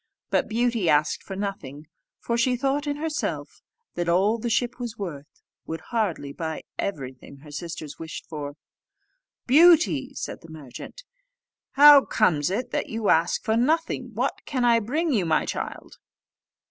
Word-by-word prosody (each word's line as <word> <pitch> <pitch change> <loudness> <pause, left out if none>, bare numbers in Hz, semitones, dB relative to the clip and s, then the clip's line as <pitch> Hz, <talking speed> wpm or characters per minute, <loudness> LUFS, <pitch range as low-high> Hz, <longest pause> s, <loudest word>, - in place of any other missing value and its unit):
But - - +2
Beauty 230 -5 +1
asked 150 +1 +2
for 195 - -8
nothing; 160 -8 -5 0.3
for 235 - -2
she 250 +2 +2
thought 275 +3 -1
in 290 - -1
herself 305 +1 -4 0.3
that 175 0 -2
all 200 +6 +2
the 235 - -2
ship 240 +2 0
was 235 -2 -5
worth 155 -8 -6 0.4
would 160 0 -5
hardly 180 -11 -1
buy 160 0 -5 0.2
everything 135 -6 -5
her 150 -1 -13
sisters 155 -1 -7
wished 160 -1 -7
for. 145 -2 -6 0.9
"Beauty," 295 -2 +5
said - - -6
the 165 - -14
merchant, 160 - -10 0.7
"how 290 0 +9
comes 160 -9 +2
it 240 +6 -3
that - - -2
you 225 -2 -1
ask 165 +2 +2
for 220 0 +1
nothing: 260 0 0
what 255 +5 -1
can 255 -4 0
I 235 -1 +5
bring 295 +8 -1
you, 205 -6 +2
my 160 -2 +1
child?" - - -6
215 Hz, 155 wpm, -25 LUFS, 160-255 Hz, 0.9 s, how